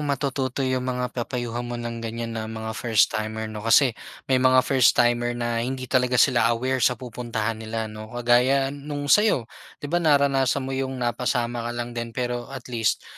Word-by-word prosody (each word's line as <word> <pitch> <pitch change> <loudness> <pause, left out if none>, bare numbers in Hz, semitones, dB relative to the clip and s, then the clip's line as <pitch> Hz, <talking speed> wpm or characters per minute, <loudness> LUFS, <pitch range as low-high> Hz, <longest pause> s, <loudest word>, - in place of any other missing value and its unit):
matututo 140 -2 -1
'yung 130 0 0
mga 125 0 -2
papayuhan 120 -1 -3
mo 120 0 -5
ng 120 -1 -5
ganiyan 115 0 -4
na 110 -1 -4
mga 110 0 -5
first 110 -2 +2
timer 110 +1 -3
'no? 105 - -6
Kasi 115 +4 +4 0.4
may 130 - +4
mga 130 0 +5
first 130 -3 +4
timer 120 0 +2
na 120 -1 -1
hindi 130 +2 -3
talaga 125 -1 +1
sila 120 -1 +4
aware 130 +3 0
sa 125 0 +3
pupuntahan 115 -3 -4
nila 110 0 -3
'no? 110 0 -8
Kagaya 125 +3 +2
'nung 145 0 -2
sayo. 210 - +4 0.3
'Di 145 +2 -8
ba 175 - +2
naranasan 140 -4 +2
mo 135 - -4
yung 135 0 -2
napasama 120 0 -1
ka - - -3
lang 120 0 -4
din 115 -1 -6
pero 120 -1 -2
at 135 -2 -8
least, 115 -2 0
120 Hz, 185 wpm, -24 LUFS, 115-130 Hz, 0.4 s, mga